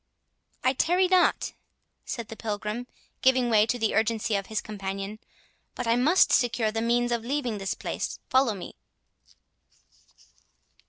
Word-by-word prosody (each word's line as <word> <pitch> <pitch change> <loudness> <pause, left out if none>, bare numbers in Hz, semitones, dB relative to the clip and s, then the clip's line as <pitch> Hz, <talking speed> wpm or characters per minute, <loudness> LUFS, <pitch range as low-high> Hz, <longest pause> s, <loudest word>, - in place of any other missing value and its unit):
"I 255 - +3
tarry 355 +7 +2
not," 370 -1 +2 0.5
said 235 -3 -5
the 225 - -7
Pilgrim, 215 +2 -4 0.3
giving 255 -2 +3
way 215 0 +5
to 245 - 0
the 220 -2 0
urgency 220 0 +1
of 195 -1 -2
his 215 -2 -1
companion; 195 0 -5 0.6
"but 245 - -4
I 230 0 +3
must 300 +10 +4
secure 235 -3 +2
the 225 +1 -2
means 240 +1 +1
of 235 -1 -1
leaving 250 -4 -2
this 195 -1 -2
place—follow 260 -5 -1
me." 180 - -8
230 Hz, 140 wpm, -27 LUFS, 215-250 Hz, 0.6 s, way